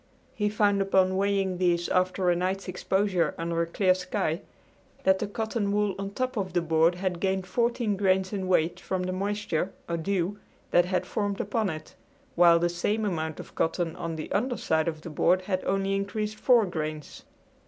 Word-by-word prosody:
He 210 -1 0
found 205 -1 +2
upon 190 -1 +3
weighing 195 -2 0
these 175 -1 +2
after 185 0 +2
a - - +2
night's 185 +3 -2
exposure 185 0 0
under 170 0 -1
a 170 - 0
clear 185 +2 +3
sky 185 -2 -2 0.6
that 190 0 +4
the 210 - -2
cotton 220 0 -2
wool 205 -1 +1
on 195 0 -3
top 255 +4 -3
of 185 -3 -2
the 175 - +2
board 165 +1 +3
had 180 -1 -2
gained 190 0 0
fourteen 235 +1 0
grains 190 0 +1
in 190 -2 -2
weight 170 -2 +2
from 185 -1 -2
the 185 - -2
moisture, 195 -2 -2 0.2
or 170 - -1
dew, 190 +3 -1 0.3
that 175 - +5
had 185 0 -1
formed 205 -2 -2
upon 210 0 0
it, 155 -1 -7 0.4
while 170 -1 +6
the 170 +1 +2
same 205 +6 -1
amount 160 -5 -2
of - - -10
cotton 165 0 -1
on 165 -1 -4
the 155 - -6
under 245 +5 0
side 160 0 0
of 155 -2 -3
the 165 - -8
board 180 +5 +2
had 185 -1 -2
only 195 0 0
increased 210 +2 -2
four 240 -3 +4
grains. 155 -4 -5
185 Hz, 190 wpm, -27 LUFS, 175-200 Hz, 0.6 s, while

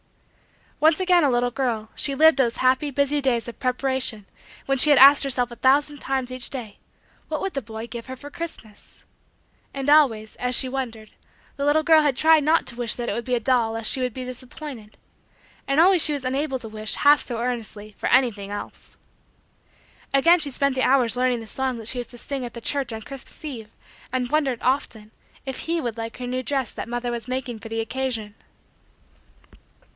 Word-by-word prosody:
Once 315 +2 +4
again 360 -2 +3
a 285 - +3
little 245 0 +1
girl, 235 -4 -2
she 275 - 0
lived 315 0 +5
those 240 -3 +2
happy, 260 +3 +2
busy, 280 +1 0
days 245 -4 0
of 235 - -9
preparation 255 -4 -1 0.4
when 270 -1 0
she 300 - +6
had 290 - +6
asked 280 +2 +8
herself 250 -3 -1
a - - -8
thousand 285 +4 +2
times 260 -2 -2
each 255 -1 -1
day: 235 -7 -8 0.5
what - - -3
would 390 - -3
the 275 - -2
boy 220 -1 -8
give 235 0 -8
her 260 - -6
for 285 +3 -11
Christmas? 325 -11 -10 0.7
And 275 +1 0
always, 230 -8 +3
as 250 0 0
she 260 - +1
wondered, 240 -5 -5 0.4
the 280 - -3
little 305 +2 +3
girl 315 0 +6
had 285 -4 0
tried 315 0 +5
not 315 +3 +2
to 240 - +2
wish 240 -2 +1
that 240 -1 -4
it - - -1
would 235 - -4
be 250 - 0
a - - 0
doll 235 -2 +1
lest 225 -1 +3
she 270 - +2
should 250 0 -1
be 255 +2 -7
disappointed. 255 -2 -9 0.7
And 275 +2 +1
always 360 0 +5
she 300 - +4
was 280 -3 -4
unable 270 +1 -1
to 240 - -9
wish, 215 0 -3
half 290 0 +5
so 240 - -4
earnestly, 225 -3 -5
for - - -3
anything 230 -6 +2
else. 205 0 -8 1.2
Again 335 +6 +5
she 300 -3 0
spent 280 +1 0
the 260 - -1
hours 255 -3 +3
learning 250 -1 0
the - - -9
song 260 +1 -2
that 225 -2 -7
she 250 - -1
was 245 - -4
to 240 - -12
sing 270 +2 -5
at 240 -1 -7
the - - -6
church 270 0 -1
on 220 -1 -6
Christmas 275 +4 -9
eve 230 -8 -7 0.4
and 250 -1 -2
wondered, 280 -6 +1
often, 235 -5 -1 0.3
if 265 -1 -5
he 335 +1 -1
would 240 -7 -3
like 225 0 -6
her 250 - -6
new 255 +1 -2
dress 265 -2 -2
that - - -7
mother 240 0 -3
was 235 -1 -5
making 250 -3 -4
for 225 - -10
the 225 0 -2
occasion. 230 -3 -3
255 Hz, 210 wpm, -23 LUFS, 235-280 Hz, 1.2 s, asked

